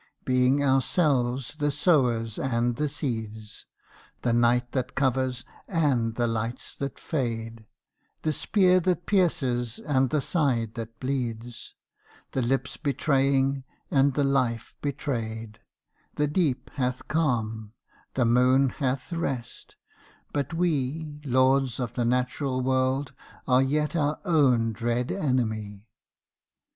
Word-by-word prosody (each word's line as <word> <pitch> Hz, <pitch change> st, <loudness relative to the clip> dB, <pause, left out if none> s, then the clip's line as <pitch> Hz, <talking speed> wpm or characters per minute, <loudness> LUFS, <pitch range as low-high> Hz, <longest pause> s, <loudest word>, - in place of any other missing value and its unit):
Being 130 Hz, +2 st, +3 dB
ourselves 135 Hz, -1 st, +1 dB
the 145 Hz, -1 st, +1 dB
sowers 125 Hz, -, +2 dB
and 120 Hz, -2 st, 0 dB
the 150 Hz, +2 st, -1 dB
seeds, 110 Hz, -7 st, -5 dB, 0.6 s
The 120 Hz, -, +2 dB
night 120 Hz, +1 st, +3 dB
that 130 Hz, -1 st, -2 dB
covers 130 Hz, -2 st, 0 dB, 0.2 s
and 130 Hz, -, +1 dB
the 120 Hz, -, +1 dB
lights 115 Hz, +1 st, -3 dB
that 140 Hz, -1 st, -4 dB
fade, 115 Hz, -6 st, -3 dB, 0.6 s
The 155 Hz, -, +1 dB
spear 185 Hz, +2 st, +3 dB
that 180 Hz, 0 st, 0 dB
pierces 135 Hz, -, +1 dB
and 135 Hz, -3 st, +1 dB
the 150 Hz, -, +1 dB
side 130 Hz, -, 0 dB
that 115 Hz, -1 st, -7 dB
bleeds, 120 Hz, -3 st, -4 dB, 0.6 s
The 130 Hz, -, -1 dB
lips 130 Hz, +2 st, -1 dB
betraying 135 Hz, -2 st, +1 dB, 0.3 s
and 135 Hz, -1 st, +3 dB
the 145 Hz, -, +2 dB
life 130 Hz, -5 st, 0 dB
betrayed; 115 Hz, -6 st, -4 dB, 0.6 s
The 150 Hz, -, +2 dB
deep 150 Hz, -4 st, 0 dB
hath 125 Hz, -2 st, -2 dB
calm: 115 Hz, -8 st, -1 dB, 0.4 s
the 125 Hz, -, +2 dB
moon 125 Hz, +3 st, +4 dB
hath 130 Hz, +4 st, -2 dB
rest: 135 Hz, -8 st, -4 dB, 0.6 s
but 140 Hz, 0 st, -1 dB
we 155 Hz, -2 st, -1 dB
Lords 130 Hz, -1 st, +2 dB
of 120 Hz, -2 st, -3 dB
the 120 Hz, -1 st, -1 dB
natural 125 Hz, +2 st, 0 dB
world 130 Hz, +1 st, 0 dB, 0.3 s
are 125 Hz, 0 st, +5 dB
yet 150 Hz, +4 st, 0 dB
our 150 Hz, -2 st, 0 dB
own 130 Hz, -, +3 dB
dread 120 Hz, +2 st, -1 dB
enemy. 110 Hz, -, -1 dB
130 Hz, 120 wpm, -26 LUFS, 120-145 Hz, 0.6 s, are